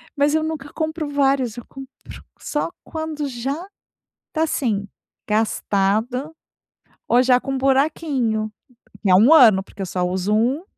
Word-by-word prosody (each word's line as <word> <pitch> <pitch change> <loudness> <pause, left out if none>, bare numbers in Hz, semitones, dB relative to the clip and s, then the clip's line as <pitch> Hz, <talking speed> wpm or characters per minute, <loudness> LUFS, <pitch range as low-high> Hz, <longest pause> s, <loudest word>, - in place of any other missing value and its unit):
Mas 290 +1 +2
eu 315 - +1
nunca 300 -3 -5
compro 315 -1 -3
vários, 270 -4 +1
eu 240 - -8
compro 270 -1 -10 0.5
só 300 +3 -3
quando 315 -2 -4
já 275 +8 -4 0.7
tá 320 0 +1
assim, 215 -10 -1 0.4
gastado 220 +5 0 0.7
ou 245 - +4
já 255 -1 +4
com 270 - -4
um 265 - -1
buraquinho. 270 -5 0 0.5
E 195 - +2
é 185 - +7
um 225 +11 +6
ano, 220 -11 +7
porque 195 - -10
eu - - -3
só 180 0 -3
uso 190 +3 -1
um. 255 - +1
265 Hz, 150 wpm, -21 LUFS, 220-300 Hz, 0.7 s, é